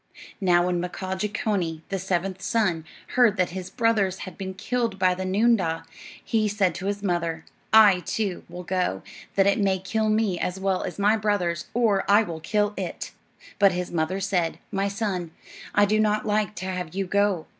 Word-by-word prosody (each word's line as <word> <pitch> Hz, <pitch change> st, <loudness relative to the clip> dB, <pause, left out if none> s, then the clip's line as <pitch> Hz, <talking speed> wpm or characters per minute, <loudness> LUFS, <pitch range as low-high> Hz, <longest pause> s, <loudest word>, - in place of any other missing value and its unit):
Now 175 Hz, -2 st, +4 dB
when 180 Hz, -1 st, 0 dB
Mkaaah 185 Hz, +1 st, -4 dB
Jeechonee, 200 Hz, -6 st, -1 dB
the 195 Hz, -, -2 dB
seventh 190 Hz, 0 st, -2 dB
son, 190 Hz, -10 st, 0 dB, 0.2 s
heard 235 Hz, -5 st, +4 dB
that 180 Hz, -1 st, +1 dB
his 185 Hz, 0 st, -6 dB
brothers 215 Hz, -5 st, +1 dB
had 185 Hz, -3 st, -9 dB
been 190 Hz, -1 st, -6 dB
killed 230 Hz, 0 st, -1 dB
by 185 Hz, -1 st, +3 dB
the 185 Hz, +1 st, -4 dB
noondah, 185 Hz, -5 st, +2 dB, 0.4 s
he 220 Hz, -2 st, +1 dB
said 200 Hz, -4 st, +1 dB
to 190 Hz, +3 st, -5 dB
his 205 Hz, 0 st, -2 dB
mother, 170 Hz, -3 st, -1 dB, 0.3 s
"I, 210 Hz, -4 st, +7 dB
too, 195 Hz, 0 st, -3 dB
will 175 Hz, +1 st, -7 dB
go, 180 Hz, -, -1 dB, 0.3 s
that 195 Hz, -, +4 dB
it 200 Hz, +1 st, +3 dB
may 195 Hz, -2 st, +2 dB
kill 215 Hz, +4 st, -1 dB
me 215 Hz, -5 st, +1 dB
as 180 Hz, +1 st, -2 dB
well 190 Hz, -1 st, 0 dB
as -, -, -6 dB
my 205 Hz, +2 st, +3 dB
brothers, 190 Hz, -6 st, -1 dB
or 220 Hz, -5 st, +3 dB
I 205 Hz, +2 st, +6 dB
will 165 Hz, -5 st, -6 dB
kill 205 Hz, +5 st, 0 dB
it." 185 Hz, -3 st, -5 dB, 0.5 s
But 200 Hz, -2 st, +5 dB
his 180 Hz, 0 st, -3 dB
mother 170 Hz, +3 st, -1 dB
said: 185 Hz, -4 st, 0 dB
"My 195 Hz, -1 st, 0 dB
son, 195 Hz, -5 st, -3 dB, 0.4 s
I 205 Hz, -, +6 dB
do 215 Hz, +2 st, +1 dB
not 215 Hz, 0 st, +1 dB
like 210 Hz, -1 st, 0 dB
to 185 Hz, -, -5 dB
have 180 Hz, -3 st, -4 dB
you 195 Hz, 0 st, -1 dB
go. 200 Hz, -3 st, +1 dB
190 Hz, 190 wpm, -25 LUFS, 180-210 Hz, 0.5 s, I